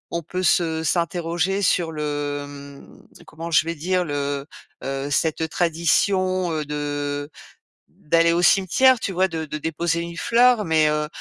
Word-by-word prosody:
on 170 - -1
peut 180 +3 -4
se 160 -1 +1
s'interroger 175 +3 -1
sur 175 -3 +1
le, 145 -2 -3
mmh, 140 0 -14
comment 165 +2 -8
je 155 - +4
vais 165 - -2
dire, 180 +3 -1
le 145 -2 -3 0.4
heu, 135 +1 -3
cette 160 +2 0
tradition, 180 +2 +1
heu, 155 - -2
de 145 0 -3 0.6
d'aller 165 +2 +1
au 170 - +1
cimetière, 235 +8 +4
tu 195 - -3
vois? 185 +1 +2
De 160 -2 -4
de 150 +1 -5
déposer 165 +2 -1
une 170 0 -6
fleur. 235 +2 +3
Mais, 160 -3 +3
heu 150 0 0
165 Hz, 155 wpm, -22 LUFS, 145-180 Hz, 0.6 s, je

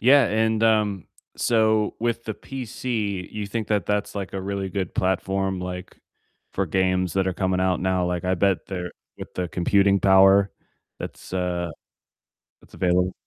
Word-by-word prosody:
Yeah, 135 +2 +6
and, 110 +1 +1
um, 105 -4 +2 0.3
so, 110 -2 +2
with 115 0 -1
the 110 - -4
PC, 110 -6 -4
you 105 -1 -4
think 110 +1 -3
that 105 -5 0
that's, 105 0 -1
like, 100 -2 -4
a 95 - -3
really 100 0 -3
good 95 -2 -3
platform, 95 0 0
like, 90 0 -6 0.5
for - - -1
games 95 -2 +1
that 95 -1 +1
are 95 - +1
coming 95 -1 0
out 95 -1 +1
now, 95 -1 +1
like, 90 -1 -2
I 90 0 +2
bet 95 0 +1
they're 90 -2 -5 0.3
with - - -9
the 90 -1 -2
computing 100 +3 +3
power 95 +1 +6 0.5
that's - - -8
uh, 90 -2 -1 0.9
that’s - - -20
available. 90 0 +1
95 Hz, 165 wpm, -24 LUFS, 90-105 Hz, 0.9 s, Yeah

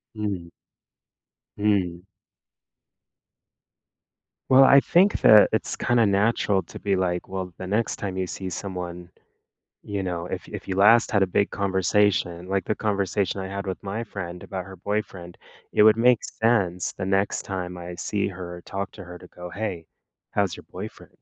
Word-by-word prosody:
Mhm. 100 -5 -3 1.1
Mm. 95 -4 0 2.4
Well, 130 +1 +8
I 140 +1 +8
think 185 +8 +3
that 105 -1 +8
it's 110 - -1
kinda 120 -2 +2
natural 100 0 +2
to - - -11
be, 100 -1 0
like, 90 -1 -1
well, 95 -1 -5
the 95 - -6
next 105 +5 0
time 95 -2 -5
you 95 -1 -2
see 95 +1 -6
someone, 90 -1 -6 0.7
you 100 -1 -3
know, 85 -2 -3
if - - -6
if - - -8
you 95 - -2
last 115 +6 +5
had 100 -4 +3
a - - 0
big 100 +3 +1
conversation, 95 -2 +1
like 95 -2 0
the 110 - -1
conversation 100 -2 -1
I 95 - -4
had 100 +1 -5
with 95 - -4
my 100 +4 -3
friend 90 -5 -7
about 95 -2 -5
her 95 0 -10
boyfriend, 95 -2 -4 0.3
it - - +4
would 110 0 +7
make 120 0 +4
sense 95 -6 0
the - - -5
next 95 +1 0
time 90 -2 -5
I 90 0 -7
see 100 +3 -1
her 90 -2 -7
or - - -12
talk 100 0 -5
to 100 - -10
her 90 0 -9
to - - -14
go, 90 0 -10
"Hey, 95 -4 -4 0.5
how's 100 -2 0
your - - -13
boyfriend?" - - -9
95 Hz, 170 wpm, -25 LUFS, 90-105 Hz, 2.4 s, Well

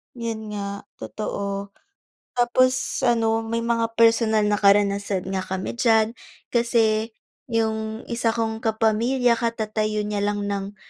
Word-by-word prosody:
'Yun 225 -2 -4
nga 200 0 -5
totoo. 200 -1 -5 0.6
Tapos 255 +2 +2
ano 225 -2 +2
may 230 +1 -3
mga 230 -1 0
personal 225 -2 +4
na 210 0 +1
karanasan 200 -1 +3
nga 190 - 0
kami 190 0 -4
diyan, 225 -2 +3 0.4
kasi 225 -2 +2 0.4
yung 220 -1 -1
isa 235 -1 0
kong 225 -1 -2
kapamilya 230 +3 +2
katatayo 215 -2 -1
niya 205 -1 -2
lang 205 0 -1
ng 200 0 -4
220 Hz, 120 wpm, -23 LUFS, 205-230 Hz, 0.6 s, personal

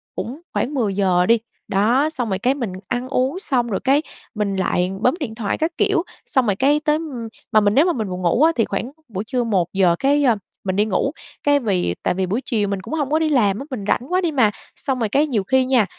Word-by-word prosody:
cũng 265 +8 -5
khoảng 285 - -1
10 225 -7 0
giờ 185 -2 +2
đi. 230 +3 +4 0.3
Đó, 240 +10 +2
xong 245 -8 -3
rồi, 190 0 -1
cái, 255 +5 +2
mình 240 -8 -4 0.2
ăn 245 +1 -2
uống 265 +8 0
xong 250 - 0
rồi, 195 -4 -1
cái, 275 +3 +4 0.3
mình 205 -2 -1
lại 185 -1 0
bấm 250 - +3
điện 240 -8 -4
thoại 220 -2 -2
các 320 +2 0
kiểu, 400 -4 +2 0.2
xong 260 -2 +1
rồi, 205 - +1
cái, 280 +7 +3
tới 300 0 +1
ưm, 275 -8 -5 0.2
mà 215 - +6
mình 205 0 +2
nếu 290 - +5
mà 355 - +2
mình 220 - -3
buồn 180 0 -4
ngủ 180 - +3
á 325 - +6
thì 225 - +2
khoảng 230 +6 -3 0.2
buổi 205 -3 -4
trưa 250 +1 -1
1 195 -7 +1
giờ, 180 -3 +3
cái, 285 +1 +3
ơ, 240 -4 +4 0.3
mình 185 - -1
đi 205 +2 +3
ngủ. 220 +6 0 0.3
Cái, 285 0 +4
vì 185 - 0
tại - - +1
vì 190 +1 -1
buổi 205 +8 -1
chiều 215 -5 0
mình 195 -1 -2
cũng 290 - -8
hông 290 -4 -1
có 310 - +3
đi 315 -1 +1
làm 215 -8 +2
á, 275 - -6
mình 220 -7 -4
rảnh - - +2
quá 370 - +3
đi 340 -3 0
mà. 240 -7 +3 0.2
Xong 265 -2 -2
rồi, 225 -3 0
cái, 290 +7 +2
nhiều 225 -8 0
khi 260 +5 +2
nha, 255 -5 +3
240 Hz, 265 wpm, -21 LUFS, 200-280 Hz, 0.3 s, mà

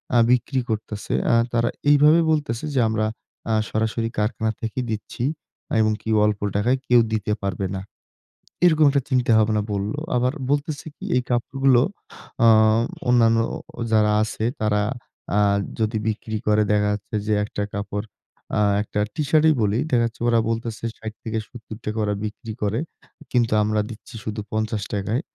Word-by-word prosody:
আ - - +6
বিক্রি 125 +2 +2
করতেছে। 105 -1 -3 0.2
আ - - +4 0.2
তারা 120 0 +2 0.2
এইভাবে 150 +3 +6
বলতেছে 150 -6 -1
যে, 135 - +2
"আমরা 110 0 0 0.5
আ - - +2 0.2
সরাসরি 110 +1 -1
কারখানা 110 +1 0
থেকে 115 +2 -3
দিচ্ছি 110 +2 -4 0.6
এবং 110 0 +3
কি - - -6 0.2
অল্প 105 -1 0 0.2
টাকায় 120 +6 +2
কেউ 120 -1 +6
দিতে 105 -1 -1
পারবে 100 -1 -2
না।" 95 - -4 0.8
এরকম 155 -3 +5
একটা 140 0 +2
চিন্তা-ভাবনা 110 -4 +3
বলল। 100 +1 -2 0.2
আবার 125 +1 +2 0.2
বলতেছে 145 +1 -1
কি? - - -9
এই - - +2
কাপড়গুলো 130 +1 +3 0.6
আ - - +7 0.6
অন্যান্য 115 -2 +5 0.4
ও - - -3
যারা 105 -1 +4
আছে 110 0 -4 0.2
তারা 105 -1 +2 0.6
আ - - +4 0.4
যদি 110 0 0
বিক্রি 110 0 -2
করে 105 0 +4
দেখা 105 0 +2
যাচ্ছে 105 +1 -6
যে, 110 - +2
একটা 105 0 -4
কাপড় 100 +1 -3 0.5
আ - - +3 0.2
একটা 105 - -4 0.2
টি-শার্টই 155 +1 +3
বলি, 105 +2 +1
দেখাচ্ছে 115 -2 +1
ওরা 115 -1 +4
বলতেছে 115 -1 -3
৬০ 110 -1 -7
থেকে 110 0 -3
৳৭০ 110 -2 -7
ওরা 105 - 0
বিক্রি 110 +1 -6
করে। 105 +3 0 0.5
কিন্তু 120 -3 +2
আমরা 105 0 +1
দিচ্ছি 115 0 -11
শুধু 105 0 -4
৳৫০ 105 -2 -2
-য়। - - -1
110 Hz, 155 wpm, -23 LUFS, 105-120 Hz, 0.8 s, আ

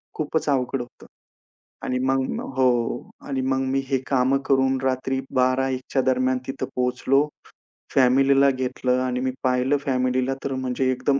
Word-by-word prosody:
खूपच 155 +1 -2
अवघड 130 -1 0
होतं 120 - -12 0.8
आणि 125 0 -1
मग 135 0 0 0.2
हो 130 -1 +4 0.6
आणि 135 -2 -1
मग 130 0 0
मी 135 - +1
हे 135 - +1
कामं 135 0 +2
करून 135 -1 +2
रात्री 130 0 0 0.2
12:00-01:00 130 0 +1
च्या 135 - +3
दरम्यान 130 0 +2
तिथं 135 +1 -3
पोहोचलो, 125 +3 +1 0.7
फॅमिलीला 135 +2 +5
घेतलं 130 -1 -1
आणि 125 -1 -1
मी 130 0 0
पाहिलं 130 +2 +2
फॅमिलीला 130 0 +1
तर 135 - -2
म्हणजे 130 0 -1
एकदम, 130 +2 +1
130 Hz, 145 wpm, -23 LUFS, 130-135 Hz, 0.8 s, फॅमिलीला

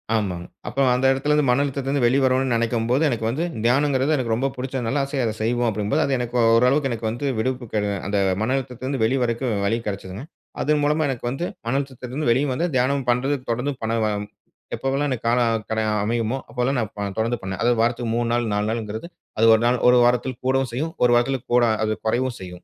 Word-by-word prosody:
ஆமாங்க. 90 -5 -2 0.2
அப்போ 135 - -1
அந்த 130 +2 0
இடத்திலிருந்து 150 +2 +1
மன 125 +3 +3
அழுத்தத்திலருந்து 140 -1 -1
வெளி 125 +3 +3
வருனுன்னு 130 -1 +2
நெனைக்கும்போது, 115 +4 +1
எனக்கு 115 -3 -2
வந்து 150 +8 -1 0.2
தியானம்ங்கிறது 135 +3 +2
எனக்கு 120 -4 -1
ரொம்ப 135 +4 0
புடிச்சதுனால, 130 +1 -2
ஆசையா 135 -2 -2
"அத 110 - -1
செய்வோம்." 120 +1 +1
அப்படீங்கும்போது, 105 0 0
அது 135 - 0
எனக்கு 120 0 -4 0.2
ஓரளவுக்கு 135 +4 +3
எனக்கு 110 -1 -3
வந்து 120 +5 -3
விடுப்பு 125 +1 -2
கெட 105 -1 +1 0.2
அந்த 100 0 0 0.2
மன 120 +4 0
அழுத்தத்திலருந்து 130 0 -4
வெளிய 130 +4 +2
வரதுக்கு 120 +2 -1 0.2
வழி 115 +3 +1
கெடைச்சுதுங்க. 100 +3 -5 0.4
அது 150 - 0
மூலமா 150 +2 +2
எனக்கு 120 -2 -4
வந்து 135 +7 -3 0.2
மன 125 - 0
அழுத்தத்திலிருந்து 130 0 -4
வெளிய 135 +5 +2
வந்து, 170 +7 0
தியானம் 130 +1 +1
பண்றது 135 +4 0
தொடர்ந்து 125 +5 -1
பண்ணுவோம். 110 -2 -1 0.5
எப்போவெல்லாம் 140 +2 -1
எனக்கு 120 -2 -4
காலம் 115 -2 +1
கட 110 0 -1 0.2
அமையுமோ! 115 +3 -1
அப்போல்லாம் 125 +1 -1
நான் 110 - -3
ப - - -7 0.2
தொடர்ந்து 115 +2 0
பண்ணேன். 95 0 -5
அதாவது 120 -1 +2
வாரத்துக்கு 115 0 0
3 120 -1 0
நாள் 120 -1 +1
4 105 +1 0
நாளுங்கிறது, 110 +4 -4 0.3
அது 115 - +4
1 110 - 0
நாள் 125 +1 +3
1 125 0 +6
வாரத்தில 125 +1 +1
கூடவும் 130 -1 +1
செய்யும். 160 +6 -2
1 120 - +5
வாரத்துல 130 +3 +2 0.2
கூட 120 -1 +5 0.2
அது 110 - 0
கொறைவும் 125 +2 0
செய்யும். 90 -1 -9
125 Hz, 195 wpm, -22 LUFS, 115-135 Hz, 0.5 s, 1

